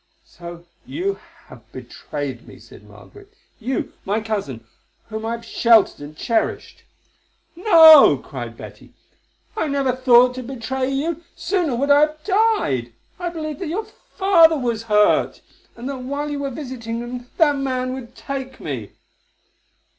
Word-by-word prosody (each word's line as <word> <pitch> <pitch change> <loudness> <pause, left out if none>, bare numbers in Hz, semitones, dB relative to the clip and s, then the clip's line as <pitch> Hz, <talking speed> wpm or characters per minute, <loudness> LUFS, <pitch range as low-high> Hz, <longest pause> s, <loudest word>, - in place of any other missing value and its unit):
"So 175 - -11 0.2
you 345 +10 -3 0.3
have - - -16
betrayed 140 -5 -7
me," - - -13
said - - -16
Margaret, 410 0 -16 0.2
"you, 255 +3 -3
my 205 +3 -1
cousin, 195 - -4 0.4
whom 220 0 -5
I 230 - -2
have 235 0 -7
sheltered 230 -1 +3
and 145 +1 -10
cherished." 230 +5 -2 0.7
"No," 325 -5 +8
cried - - -8
Betty. - - -13 0.6
"I 325 - -1
never 275 -2 0
thought 250 -1 +5
to 255 - -6
betray 255 +1 -4
you; 300 +5 -2
sooner 340 -7 -1
would 280 +4 0
I 285 - +7
have 305 0 0
died. 375 - +1 0.3
I 355 -1 -2
believed 310 -2 -6
that 370 - -4
your 400 +8 -3 0.3
father 335 -5 +5
was 235 -4 -2
hurt, 210 0 +3 0.3
and 235 +2 -7
that 275 -1 -5
while 285 +3 -4
you 290 - -3
were 280 -1 -3
visiting 245 -4 -6
him 245 0 -7
that 295 -4 +3
man 255 -2 -2
would 255 -2 -9
take 265 -1 -6
me." 125 -9 -6
260 Hz, 145 wpm, -21 LUFS, 230-310 Hz, 0.7 s, No